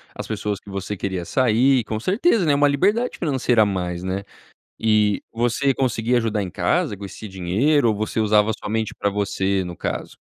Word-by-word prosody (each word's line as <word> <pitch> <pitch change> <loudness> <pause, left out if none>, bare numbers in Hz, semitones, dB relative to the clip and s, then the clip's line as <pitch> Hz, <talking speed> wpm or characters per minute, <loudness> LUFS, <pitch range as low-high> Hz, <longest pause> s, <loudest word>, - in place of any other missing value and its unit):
as - - -6
pessoas 105 -1 -3
que - - -15
você 100 +1 -4
queria 95 -2 -3
sair, 130 +2 +3
com 110 0 -4
certeza, 200 - +2
né. 145 -2 +3
Uma 145 +1 +4
liberdade 205 - +1
financeira 130 -8 +2
a - - +2
mais, 90 -3 -3
né. 95 +1 -3 0.6
E 105 -2 +2
você 120 +4 +1
conseguia 125 -1 +1
ajudar 110 -3 -1
em 90 - -6
casa 100 - 0
com 100 - -9
esse 100 +2 -8
dinheiro 105 - +1
ou 110 - +2
você 110 +1 -2
usava 105 0 +3
somente 110 0 -2
para 100 - -1
você, 100 -1 -1
no 90 -1 -7
caso? - - -4
110 Hz, 185 wpm, -22 LUFS, 100-130 Hz, 0.6 s, Uma